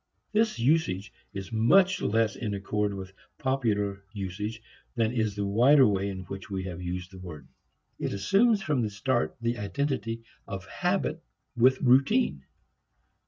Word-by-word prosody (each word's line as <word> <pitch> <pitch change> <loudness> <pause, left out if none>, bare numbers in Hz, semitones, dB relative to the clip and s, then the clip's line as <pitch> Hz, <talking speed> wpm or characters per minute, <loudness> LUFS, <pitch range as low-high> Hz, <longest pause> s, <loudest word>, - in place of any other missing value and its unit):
This 220 0 +2
usage 115 - +1 0.2
is 95 +1 -7
much 185 +12 +4
less 110 -1 +1
in 105 -5 -3
accord 105 +1 -1
with 95 0 -8 0.2
popular 105 -7 -1
usage 105 +3 -5 0.3
than 115 -2 +1
is 110 -4 -1
the 100 0 -2
wider 125 +7 +6
way 100 -1 0
in 95 -1 -5
which 95 +2 -8
we 95 -2 -3
have 90 -2 -6
used 90 +1 -5
the 95 - -11
word. 80 -7 -9 0.5
It - - -2
assumes 195 - +3
from 150 -5 +1
the 110 - 0
start 120 +4 -1
the 120 0 -1
identity 115 +2 -2 0.2
of 95 -2 -6
habit 175 - -1 0.3
with 130 +2 +4
routine. 120 - +3
110 Hz, 150 wpm, -28 LUFS, 95-130 Hz, 0.5 s, wider